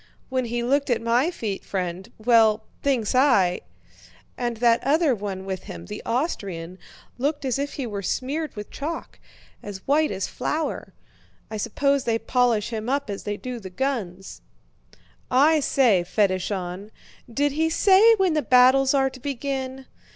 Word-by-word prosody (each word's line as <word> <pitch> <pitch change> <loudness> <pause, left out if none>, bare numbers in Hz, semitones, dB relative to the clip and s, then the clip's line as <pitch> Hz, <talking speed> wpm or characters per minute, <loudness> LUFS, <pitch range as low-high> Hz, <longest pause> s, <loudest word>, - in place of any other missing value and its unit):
"When 255 -1 -1
he 240 +1 -2
looked 275 +3 +1
at 240 -2 +2
my 235 +7 +2
feet, 215 - -4
friend... 185 -1 -4
well, 220 -1 +4 0.2
thinks 255 -7 0
I..." 250 -10 +3 0.7
"And 240 -2 -3
that 235 0 +3
other 295 +1 +3
one 195 -3 -5
with 190 -1 -5
him, 85 0 -8
the - - -7
Austrian, 190 - -3 0.4
looked 285 +2 -1
as 260 0 0
if 285 0 -3
he 275 - -4
were 205 -3 -4
smeared 280 - -3
with 210 -1 -8
chalk—as 275 - -8
white 300 +2 +3
as 195 -1 -2
flour! 315 +1 -3 0.6
I 215 - -3
suppose 275 +5 0
they 230 -1 +1
polish 240 -3 +1
him 220 +1 -3
up 275 -5 -1
as 200 - -6
they 205 0 -2
do 250 0 -6
the 190 -4 -8
guns." 195 - -4 0.9
"I 300 +5 +4
say, 245 -10 +3
Fédeshon!... 185 0 -1 0.4
Did 285 +4 +1
he 320 +3 +1
say 400 +6 +6
when 380 -5 +2
the 305 - +1
battles 260 +1 +5
are 270 -1 +2
to 260 - -12
begin? 265 0 -4
245 Hz, 155 wpm, -24 LUFS, 205-280 Hz, 0.9 s, say